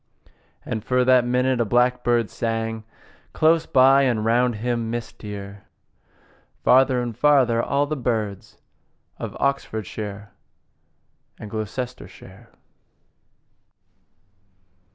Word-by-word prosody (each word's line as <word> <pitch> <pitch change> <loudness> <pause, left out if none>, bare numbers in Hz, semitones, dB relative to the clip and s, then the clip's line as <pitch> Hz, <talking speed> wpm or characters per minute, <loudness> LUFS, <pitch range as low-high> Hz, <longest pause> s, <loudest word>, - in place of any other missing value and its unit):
And 110 - -4
for 125 0 +1
that 130 -1 +4
minute 125 0 +1
a - - +4
blackbird 120 0 +1
sang 115 -1 -3 0.5
Close 165 +1 +2
by, 135 +1 +5
and 120 -5 0
round 120 +1 +2
him, 115 +1 -2
mistier, 105 -4 -7 1.0
Farther 130 -1 +4
and 120 -2 -5
farther, 130 -5 +3
all 140 +4 0
the 155 +1 -3
birds 110 -7 -3 0.6
Of - - -6
Oxfordshire 105 -6 -3 1.1
and 105 - -10
Gloustershire. 120 +4 -7
120 Hz, 90 wpm, -23 LUFS, 110-130 Hz, 1.1 s, by